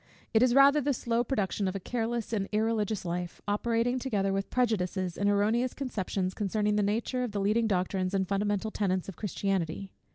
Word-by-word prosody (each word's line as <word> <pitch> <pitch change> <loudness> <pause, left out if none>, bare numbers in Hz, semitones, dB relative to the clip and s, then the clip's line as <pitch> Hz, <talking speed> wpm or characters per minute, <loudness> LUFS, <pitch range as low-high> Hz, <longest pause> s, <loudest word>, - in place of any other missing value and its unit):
It 220 - +5
is 250 0 +4
rather 280 +2 +7
the 285 0 +1
slow 235 0 0
production 205 -5 -1
of 185 - -2
a - - -2
careless 230 +2 -3
and 200 -3 -1
irreligious 215 -2 0
life, 175 0 -4
operating 230 +4 +1
together 200 -7 0
with 195 0 -2
prejudices 190 -7 0
and 200 0 +1
erroneous 220 +5 +1
conceptions, 195 -7 -2
concerning 210 +1 0
the 210 - +2
nature 225 +5 0
of 240 -4 -4
the 205 - -1
leading 215 +3 +2
doctrines 185 -1 0
and 190 -1 +1
fundamental 205 +2 0
tenets 190 -4 -1
of 195 - -7
Christianity. 195 -1 -2
205 Hz, 185 wpm, -29 LUFS, 195-230 Hz, -, rather